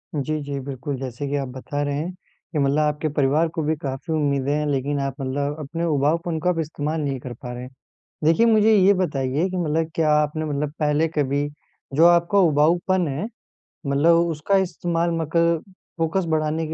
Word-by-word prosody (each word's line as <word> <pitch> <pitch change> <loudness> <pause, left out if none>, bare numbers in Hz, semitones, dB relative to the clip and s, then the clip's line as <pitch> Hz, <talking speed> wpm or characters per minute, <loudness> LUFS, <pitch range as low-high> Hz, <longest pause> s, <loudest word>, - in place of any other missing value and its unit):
जी, 155 +2 -1
जी, 140 -1 -4
बिल्कुल 135 +1 -5
जैसे 130 +1 -5
कि 145 - -1
आप 135 - -2
बता 145 +2 -4
रहे 145 0 -1
हैं 165 +5 -3 0.4
कि 155 - 0
मतलब 140 +2 +2
आपके 150 +1 0
परिवार 150 +3 +2
को 160 - -1
भी 155 +1 +1
काफ़ी 135 +4 -4
उम्मीदें 140 -3 0
हैं, 150 - 0
लेक़िन 140 +1 -1
आप 135 -1 -2
मतलब 140 +3 -2
अपने 155 +3 -4
उबाऊपन 160 +2 0
को 180 - +1
आप 170 - 0
इस्तेमाल 155 0 -2
नहीं 140 -3 -2
कर 125 0 -7
पा 125 +1 -8
रहे 125 0 -6
हैं, 125 - -8 0.6
देखिए 165 +9 +4
मुझे 220 -1 +5
ये 200 0 +6
बताइए 150 -2 0
कि 185 - -4
मतलब 160 -1 0
क्या 155 -2 +2
आपने 150 +1 +1
मतलब 145 -1 -2
पहले 150 +1 +2
कभी 145 0 +1 0.5
जो 165 +3 +7
आपका 175 +3 +4
उबाऊपन 175 +2 +3
है, 145 +8 -3 0.6
मतलब 145 +5 +4
उसका 165 +5 +1
इस्तेमाल 170 0 -1
मकल 170 +1 +2 0.4
फ़ोकस 165 +3 0
बढ़ाने 155 +1 -1
के 160 - -5
150 Hz, 190 wpm, -23 LUFS, 140-165 Hz, 0.6 s, जो